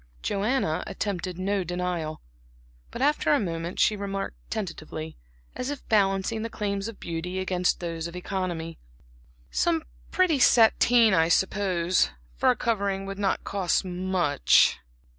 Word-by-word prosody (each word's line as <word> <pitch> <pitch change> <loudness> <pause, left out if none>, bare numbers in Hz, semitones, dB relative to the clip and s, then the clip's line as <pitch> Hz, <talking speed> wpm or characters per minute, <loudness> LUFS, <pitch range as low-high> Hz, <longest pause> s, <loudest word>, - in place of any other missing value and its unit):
Joanna 205 -5 0
attempted 190 -3 -3
no 195 +1 0
denial; 175 -3 -3 0.7
but 255 - -4
after 295 +1 +2
a 290 - +4
moment 170 -2 -4
she 215 - +4
remarked 195 -1 -4
tentatively, 160 -6 -5 0.4
as 255 +1 -3
if 290 -2 -6
balancing 200 +1 +2
the 230 - -3
claims 200 -2 -3
of 230 - -8
beauty 170 +2 -4
against 185 -1 0
those 165 -1 -3
of 170 - -10
economy; 180 -3 -4 0.7
"Some 330 -2 +1 0.3
pretty 355 -6 +2
sateen, 235 -1 +5
I 165 -3 +4
suppose, 185 -1 +2 0.3
for - - +2
a 250 - +4
covering 200 -4 -1
would 195 0 -6
not 195 -1 0
cost 195 -1 0
much." 180 -5 +3
190 Hz, 135 wpm, -26 LUFS, 175-215 Hz, 0.7 s, sateen